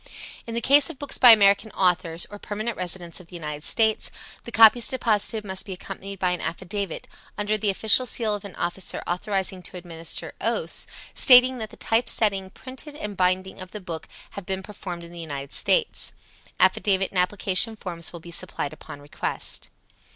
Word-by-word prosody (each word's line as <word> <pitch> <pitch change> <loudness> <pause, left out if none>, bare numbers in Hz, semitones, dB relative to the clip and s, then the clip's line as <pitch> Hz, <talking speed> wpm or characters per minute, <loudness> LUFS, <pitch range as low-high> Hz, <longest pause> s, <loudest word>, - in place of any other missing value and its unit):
In 230 - -5
the 235 - 0
case 280 +3 +4
of - - -8
books 285 -1 -5
by 250 - +9
American 205 -1 +6
authors, 175 -2 +2
or 205 - -9
permanent 215 +3 -4
residents 175 -2 -2
of 180 - -15
the 180 - -12
United 150 -3 -6
States, 220 +2 +2 0.4
the 235 - -8
copies 225 +1 +7
deposited 220 -3 0
must 190 -1 -3
be 195 -2 -7
accompanied 195 +2 -8
by 180 -1 0
an 180 - -3
affidavit, 190 +1 -5 0.3
under 210 +1 0
the 215 -1 0
official 220 +5 +5
seal 225 -2 -1
of 205 - -5
an 200 -3 -9
officer 175 +2 -2
authorized 190 +2 -1
to 180 - -9
administer 170 -2 -6
oaths, - - -1 0.3
stating 255 -1 +6
that 220 -1 -5
the - - -15
typesetting, 215 -4 +1
printing 265 +7 -10
and 210 -7 -6
binding 185 +1 -1
of 185 0 -10
the 210 - -6
book 170 -4 -7 0.2
have 200 - -8
been 190 0 -2
performed 185 -4 -7
within 170 0 -12
the 170 - -9
United 140 -4 -7
States. 475 -3 +2 0.5
Affidavit 195 -2 +2
and 185 - -1
application 195 +3 +2
forms 170 -5 -2
will 170 - -9
be 170 +1 -12
supplied 170 -4 -3 0.2
on 145 - -8
request. 145 - -4
195 Hz, 180 wpm, -24 LUFS, 180-220 Hz, 0.5 s, by